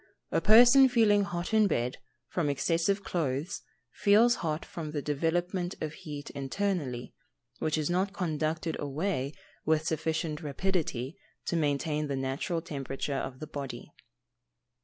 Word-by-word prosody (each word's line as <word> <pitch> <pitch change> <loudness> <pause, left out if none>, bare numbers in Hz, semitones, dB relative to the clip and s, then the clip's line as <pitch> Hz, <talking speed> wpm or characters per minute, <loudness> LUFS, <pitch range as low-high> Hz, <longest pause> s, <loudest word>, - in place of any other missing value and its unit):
A - - +2
person 245 +5 +8
feeling 220 -4 +4
hot 175 +3 -4
in 215 -1 +5
bed, 125 -7 -1 0.3
from 160 0 -1
excessive 170 +7 +1
clothes, 155 0 -2 0.3
feels 225 +4 +5
hot 155 -2 -2
from 155 -3 -6
the 145 - -1
development 175 +5 -1
of 155 -1 -3
heat 145 -2 -7
internally, 140 -3 -2 0.5
which 155 0 0
is 155 -2 0
not 185 +3 +1
conducted 160 -3 -1
away 145 -1 -1 0.3
with 155 0 +2
sufficient 160 0 -1
rapidity 150 -4 -2 0.3
to - - -1
maintain 150 0 0
the 140 - -2
natural 135 +6 -2
temperature 140 -2 -4
of 130 -1 -3
the 155 - -5
body. 140 -5 -7
160 Hz, 135 wpm, -30 LUFS, 145-180 Hz, 0.5 s, person